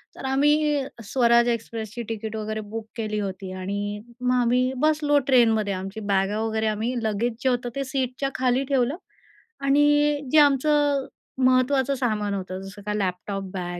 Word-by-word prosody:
तर - - -8
आम्ही 295 +2 +2 0.2
स्वराज 235 +1 +3
एक्सप्रेसची 230 -1 -4
तिकीट 220 -1 -4
वगैरे 215 0 -3
बुक 215 +1 -6
केली 215 -2 -2
होती 190 -1 -5
आणि 200 +2 -4 0.2
मग 250 0 +1
आम्ही 250 +1 +2
बसलो 300 +1 +2
ट्रेनमध्ये 225 -6 +3
आमची 195 +3 -5
बॅगा 200 0 0
वगैरे 220 0 -1
आम्ही 220 +3 -1
लगेच 220 +2 0
जे 260 - +3
होतं 245 -1 -1
ते 275 - -1
सीटच्या 265 0 -2
खाली 255 +1 +1
ठेवलं 270 +2 +1 0.7
आणि 290 +1 +3
जे 310 - +4
आमचं 290 -1 +3 0.4
महत्त्वाचं 260 +1 +3
सामान 215 -6 -1
होतं, 185 -1 -4
जसं 195 +1 -10
का 210 - -2
लॅपटॉप, 195 0 -2
बॅग 175 -2 -4
235 Hz, 150 wpm, -24 LUFS, 210-270 Hz, 0.7 s, जे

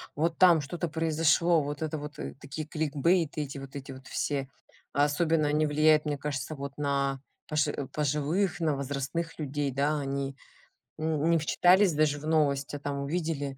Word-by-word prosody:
вот 165 +3 0
там 175 -4 +6
что-то 170 +5 -3
произошло, 160 +1 +2
вот 145 +1 -5
это 155 0 -2
вот, 150 0 -8
э, - - -5
такие 145 +2 -6
кликбейты 155 +1 +1
эти, 140 -1 -5
вот 135 0 -9
эти 135 -1 -7
вот 130 0 -11
все, 140 -2 -2 0.5
особенно 150 +2 +2
они 150 +1 +2
влияют, 155 +1 +4
мне 145 -1 -1
кажется, 140 +1 -4
вот 140 -1 -7
на 140 -2 0 0.3
пожи 150 -2 -1
пожилых, 150 +6 0
на 155 -3 +1
возрастных 140 +5 -3
людей. 145 -1 -2
Да, 145 +3 +1
они, 140 -1 -3 0.6
м, 155 0 0
не 170 - +4
вчитались 180 +4 +4
даже 150 -1 +2
в 150 - -9
новость, 145 -3 +1
а 145 - -5
там 140 0 -3
увидели: 145 -2 -2
150 Hz, 170 wpm, -29 LUFS, 140-160 Hz, 0.6 s, там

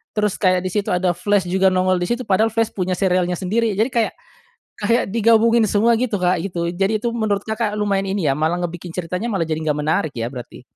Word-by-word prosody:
terus 210 -2 0
kayak 185 -2 +2
di 185 - -3
situ 205 0 -1
ada 180 0 +1
Flash 190 +3 0
juga 190 +1 +3
nongol 185 0 +2
di 175 - -2
situ 240 +4 -2
padahal 215 +2 +2
Flash 225 0 -1
punya 185 -1 -2
serialnya 180 -1 +1
sendiri, 215 +4 -1
jadi 220 +6 +1
kayak, 230 -3 0 0.6
kayak 230 +4 +1
digabungin 230 +1 +4
semua 220 +3 +3
gitu, 230 -5 -1
Kak, 180 0 +2
gitu. 170 -3 -3
Jadi 195 +5 0
itu 235 - 0
menurut 210 -3 0
Kakak 220 -1 -1
lumayan 200 -2 0
ini, 195 -6 -1
ya, 135 - +1
malah 160 +3 0
ngebikin 175 0 -5
ceritanya 180 +4 -4
malah 170 -6 -1
jadi 155 - 0
gak 150 -1 0
menarik, 160 +1 0
ya, 115 -1 -3
berarti? 125 -2 -9
190 Hz, 220 wpm, -20 LUFS, 180-220 Hz, 0.6 s, digabungin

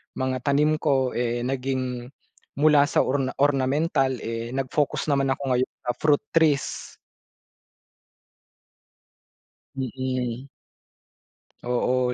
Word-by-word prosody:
mga 130 -1 -2
tanim 150 +2 +3
ko 135 -4 +2
eh, 120 0 -1
naging 130 -2 -2 0.5
mula 150 -1 +6
sa - - +3
orna 135 -1 0
ornamental 135 0 +2
eh, 115 0 -4
nag-focus 135 +3 -1
naman 140 -1 +2
ako 140 - -8
ngayon 125 +1 0
sa 125 - 0
fruit 150 -2 +3
trees. 155 -4 +1 2.8
Mm. 130 -1 -3 1.2
Oo, 125 0 +1
130 Hz, 95 wpm, -25 LUFS, 125-140 Hz, 2.8 s, mula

